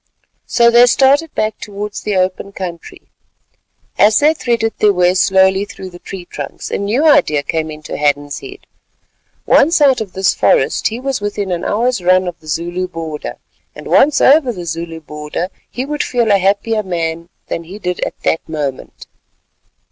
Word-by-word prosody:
So 235 -1 +4
they 240 +1 +7
started 280 +6 +3
back 215 0 -1
towards 205 0 -6
the 210 - -2
open 185 +2 -1
country. 175 -4 -7 1.0
As 210 +1 +5
they 300 +2 +4
threaded 235 -6 -1
their 210 - +5
way 180 -1 +3
slowly 190 +1 +3
through 190 -2 -9
the 175 - -12
tree 185 -1 -8
trunks, 145 -5 -7
a - - -1
new 220 +10 0
idea 155 - +4
came 160 +2 -2
into 155 -1 -7
Hadden's 145 0 0
head. 395 0 -11 0.8
Once 325 +4 +4
out 270 -5 +4
of 200 -4 -6
this 190 -1 +2
forest, 135 - +2
he 225 +2 -4
was 265 -3 -3
within 205 -2 -3
an 175 0 -2
hour's 235 0 0
run 185 +1 +3
of 175 - -6
the 155 - -18
Zulu 175 +3 -2
border, 165 -4 -6 0.4
and - - -10
once 290 0 +4
over 275 -2 +5
the 180 -6 -7
Zulu 165 0 -5
border, 150 +3 -5 0.2
he 255 - -4
would 295 +1 -3
feel 235 -3 0
a 200 - +4
happier 205 +3 +1
man 170 -3 -3 0.2
than 165 - -5
he 185 +5 -9
did 180 -4 -3
at - - -4
that 160 - +1
moment. 145 -4 -5
190 Hz, 175 wpm, -16 LUFS, 170-235 Hz, 1.0 s, they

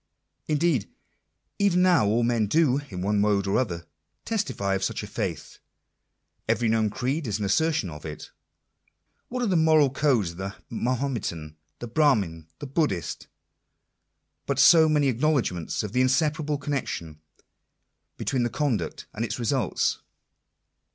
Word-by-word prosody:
Indeed 150 -6 +1 0.7
even 185 -3 +3
now 175 - +4
all 115 +3 +2
men 115 -3 +1
do, 140 +2 +3
in 90 -3 -5
one 100 +1 +1
mode 100 -1 +2
or 100 - +1
other, 85 -9 -3 0.4
testify 130 - -1
of 95 - -1
such - - -2
a - - -6
faith. - - -5 0.9
Every 120 - +2
known 110 -1 +2
creed 135 +7 -2
is 105 -2 -1
an 105 - -3
assertion 150 - +1
of 75 0 -10
it. 75 -1 -8 1.0
What 250 0 -2
are - - +1
the 190 - +1
moral 155 -4 +4
codes 130 - +1
of 85 - -14
the 95 +1 -5 0.2
Mahometan, 115 - -2 0.2
the 120 - -7
Brahmin, 105 - +1
the - - -7
Buddhist, 140 - -2 1.2
but 140 - -1
so 160 +3 +7
many 150 -2 +3
acknowledgments 125 - 0
of 105 - -5
the 125 - +2
inseparable 150 +3 +1
connection 130 - -4 1.0
between 120 -3 0
conduct 120 - -2
and 110 - -3
its 115 - -3
results 120 -3 0
125 Hz, 140 wpm, -26 LUFS, 100-150 Hz, 1.2 s, so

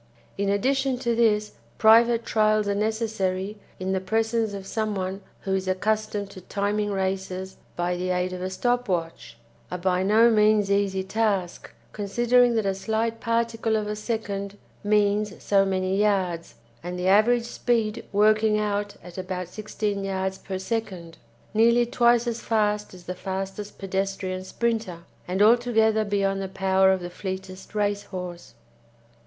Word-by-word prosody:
In 200 0 -1
addition 265 +6 +1
to 240 -2 -1
this 215 -2 +2 0.3
private 230 +1 +5
trials 215 -1 +2
are 200 - +1
necessary 210 -2 -1 0.2
in 185 +1 -2
the 190 - +1
presence 220 +3 0
of 195 -1 -7
someone 195 -3 -2 0.2
who 190 - -2
is 190 0 -1
accustomed 210 +1 -1
to 190 - -11
timing 205 +2 -1
races 190 -1 -3 0.2
by 175 +1 -1
the 180 +1 -3
aid 180 0 0
of 180 - -6
a 185 - -2
stop 245 +4 0
watch 165 -8 -3 0.3
a 180 - -3
by 180 0 +1
no 220 +5 +5
means 210 -2 +3
easy 195 -1 +1
task, 195 -3 -1 0.2
considering 240 +4 +3
that 220 -2 +1
a 195 - +1
slight 220 +3 -2
particle 230 -1 0
of 215 -1 0
a 210 - -2
second 205 -2 -4 0.3
means 205 -1 +2
so 195 -1 +3
many 190 0 0
yards, 190 -5 0 0.3
and 180 +1 -5
the 180 +1 -1
average 230 +5 +4
speed 230 -2 -1
working 215 +1 +4
out 205 -1 -1
at 180 +1 -9
about 180 -1 -4
16 210 0 -3
yards 190 0 -2
per 190 -1 -5
second 185 -5 -4 0.3
nearly 235 +2 +4
twice 240 0 +3
as 235 -1 -3
fast 210 -3 0
as 180 - -13
the 180 - -5
fastest 195 +2 -5
pedestrian 195 -1 -3
sprinter, 215 -4 -2 0.2
and 190 +3 +2
altogether 220 -1 +4
beyond 195 -1 0
the 195 - -3
power 190 0 +3
of 190 -1 0
the 175 - -5
fleetest 190 +1 -7
race 205 -1 0
horse. 180 -3 -7
205 Hz, 155 wpm, -25 LUFS, 190-220 Hz, 0.3 s, private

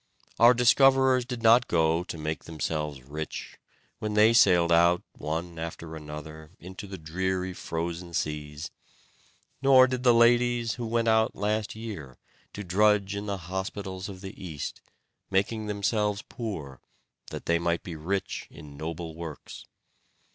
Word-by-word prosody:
Our 120 +2 +7
discoverers 130 +1 +5
did 125 -2 -6
not 115 +2 +6
go 80 0 +2
to 85 - -7
make 80 0 -4
themselves 75 -3 -3
rich, 75 +4 -7 0.4
when 105 -1 -3
they 110 +2 +6
sailed 90 -7 +5
out 85 +1 +4
one 85 +2 -4
after 80 0 -6
another 75 0 -9
into 95 +3 -9
the 95 0 -7
dreary 95 +3 -2
frozen 85 0 -4
seas; 75 -1 -3 0.9
nor 135 -1 +7
did 130 -1 -2
the 125 -1 +5
ladies, 120 0 +3
who 120 -2 -5
went 115 0 0
out 110 +1 +3
last 105 +1 -1
year, 100 - -7 0.4
to 105 - -6
drudge 100 +2 +2
in 100 +1 -5
the 100 -1 -2
hospitals 95 +1 -5
of 95 -2 -9
the 95 -1 -9
East, 80 -6 -6 0.5
making 105 +3 0
themselves 105 0 0
poor, 80 - -6 0.5
that - - -7
they 85 0 +2
might 85 0 -1
be 85 - -6
rich 95 +6 -3
in 75 -2 -12
noble 80 +2 -5
works. 80 -3 -8
95 Hz, 145 wpm, -27 LUFS, 80-110 Hz, 0.9 s, Our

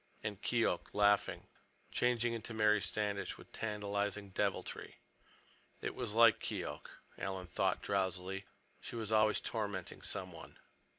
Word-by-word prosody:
And 105 -2 -3
Keok, 115 -7 +1
laughing, 105 0 +3 0.5
changed 125 -1 +2
into 115 -1 -2
Mary 105 -1 +4
Standish 100 -1 -1
with - - -14
tantalizing 105 -2 -2
deviltry. 100 0 -2 0.8
It - - -3
was 115 -4 -3
like 115 -2 +7
Keok, - - -4 0.3
Alan 95 -1 -3
thought 85 - 0
drowsily—she 95 +2 -3
was 110 -2 -3
always 110 -1 +5
tormenting 100 -5 -3
someone. 90 -5 -6
105 Hz, 115 wpm, -36 LUFS, 95-110 Hz, 0.8 s, like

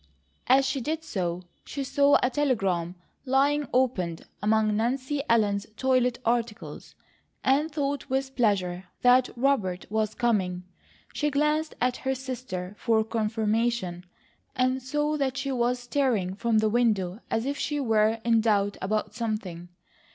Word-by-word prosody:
As 265 +2 +5
she 265 0 -1
did 315 +5 -3
so, 180 - -3 0.2
she 280 - -5
saw 280 +2 +4
a 250 - +2
telegram, 195 - 0 0.3
lying 280 +2 +2
opened 205 -10 0 0.2
among 215 0 +2
Nancy 260 +6 -1
Ellen's 210 -3 +2
toilet 255 -2 +2
articles, 230 -1 -2 0.5
and 280 +4 +2
thought 285 -2 -2
with 265 0 -1
pleasure 190 -6 0 0.2
that 250 +1 +5
Robert 235 -9 0
was 215 -1 0
coming. 190 -7 0 0.5
She 295 - 0
glanced 300 +2 0
at 250 +1 +1
her 265 0 -2
sister 245 -8 -6
for 225 -2 +2
confirmation, 220 -4 -1 0.5
and 255 +1 +1
saw 295 +4 -1
that 270 -2 -1
she 275 0 -2
was 245 -1 +1
staring 245 -7 0
from 225 +3 0
the 215 0 +3
window 210 -5 +1
as 225 - -1
if 285 +1 -2
she 295 -1 -1
were 220 -3 +2
in 230 -1 +4
doubt 205 -2 +1
about 210 +2 -1
something. 210 -7 -4
235 Hz, 140 wpm, -27 LUFS, 210-265 Hz, 0.5 s, As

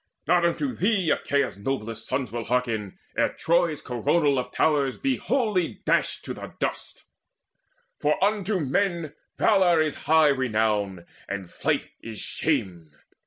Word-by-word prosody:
Not 175 +1 +4
unto 255 - 0
thee 195 -6 +1
Achaea's 140 -7 0
noblest 115 -1 -4
sons 130 -4 -2
Will 115 -1 -4
hearken, 115 -6 -1 0.2
ere - - +1
Troy's 170 -3 +1
coronal 140 +3 +1
of 125 - -5
towers 145 -4 +1
Be 270 -1 0
wholly 215 -10 0
dashed - - +1
to - - -4
the - - -9
dust: - - -4 1.0
for 150 +1 +2
unto 205 -1 +1
men 165 +1 0 0.2
Valour 185 -6 +4
is 155 -2 0
high 160 -1 +6
renown, 105 -8 0 0.2
and 95 -2 -5
flight - - -1
is 115 -2 -8
shame! 95 - -2
145 Hz, 135 wpm, -25 LUFS, 115-175 Hz, 1.0 s, high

